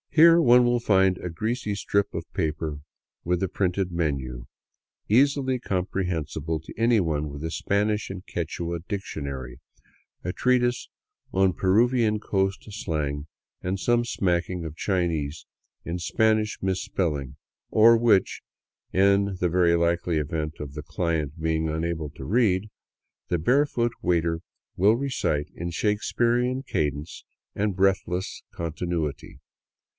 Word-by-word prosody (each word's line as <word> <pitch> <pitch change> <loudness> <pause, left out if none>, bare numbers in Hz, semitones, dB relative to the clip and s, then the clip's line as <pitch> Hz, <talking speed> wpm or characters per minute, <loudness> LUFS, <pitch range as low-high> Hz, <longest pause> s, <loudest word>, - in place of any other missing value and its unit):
Here 165 +1 +7
one 125 -4 +6
will 120 0 +2
find 95 -5 +3
a 90 - -4
greasy 110 +5 -2
strip 100 +1 0
of - - -4
paper 80 -1 -2 0.4
with 90 +1 0
a - - +2
printed 90 0 -1
menu, 70 -8 -2 0.6
easily 130 +2 +3
com 95 -6 -1
prehensible 80 -4 -2
to - - -10
anyone 90 -11 +2
with 70 +1 -8
a 80 - -3
Spanish 105 +4 0
and 95 0 -7
Quichua 85 0 -3
dictionary, 70 - -5 0.6
a 90 - -2
treatise 125 -1 +1 0.4
on 95 -1 +3
Peruvian 110 +3 +2
coast 95 -1 -1
slang, 75 -8 -3 0.3
and 95 +1 -2
some 120 +2 +2
smacking 90 -5 -1
of 80 -1 -6
Chinese 80 -6 -1 0.4
in 85 +1 -3
Spanish 110 +4 +1
mis 95 -1 0
spelling; 75 -8 -2 0.3
or 115 +2 +7
which, 115 -4 +3 0.5
in 100 0 +3
the 90 - +1
very 85 0 +3
likely 85 0 +1
event 75 +1 -2
of 70 -2 -6
the 75 0 -6
client 80 -1 -2
being 80 0 0
unable 80 -1 -2
to 70 -2 -10
read, 105 - +2 0.6
the 90 - +1
barefoot 120 - +2
waiter 85 -1 +1 0.3
will 100 +5 +4
recite 125 - -1
in 85 +1 -4
Shakesperean 120 +7 0
cadence 75 0 -2 0.3
and 100 -2 0
breathless 95 -1 0
continuity. 80 -3 -4
90 Hz, 130 wpm, -26 LUFS, 80-105 Hz, 0.6 s, Here